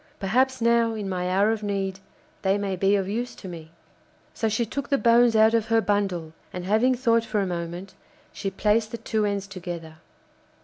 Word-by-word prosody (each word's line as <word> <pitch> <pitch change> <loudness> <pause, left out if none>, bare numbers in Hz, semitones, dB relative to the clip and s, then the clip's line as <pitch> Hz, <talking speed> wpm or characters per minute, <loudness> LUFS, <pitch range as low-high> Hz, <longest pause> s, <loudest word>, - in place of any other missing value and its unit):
Perhaps 255 +6 +1
now, 230 -1 +3
in 210 -2 -4
my 180 -1 -2
hour 200 +4 +3
of 225 -1 -2
need, 195 -2 -2 0.4
they 195 +1 +2
may 200 -2 -2
be 195 +2 +2
of 195 -2 0
use 235 +5 -3
to 195 - -10
me.' 165 -3 -9 0.6
So 225 - -1
she 225 +2 0
took 275 +5 -5
the 280 - +3
bones 235 -1 +4
out 220 +1 +5
of 225 -1 +1
her 225 0 +3
bundle, 195 -6 -1 0.2
and 180 -1 -6
having 220 +6 +3
thought 230 -2 +2
for 220 -2 -1
a 200 - +1
moment, 175 +1 -5 0.4
she 195 - -3
placed 215 +3 +1
the 235 - -5
two 220 -2 -1
ends 200 -1 -2
together. 175 -5 -7
205 Hz, 200 wpm, -25 LUFS, 190-230 Hz, 0.6 s, out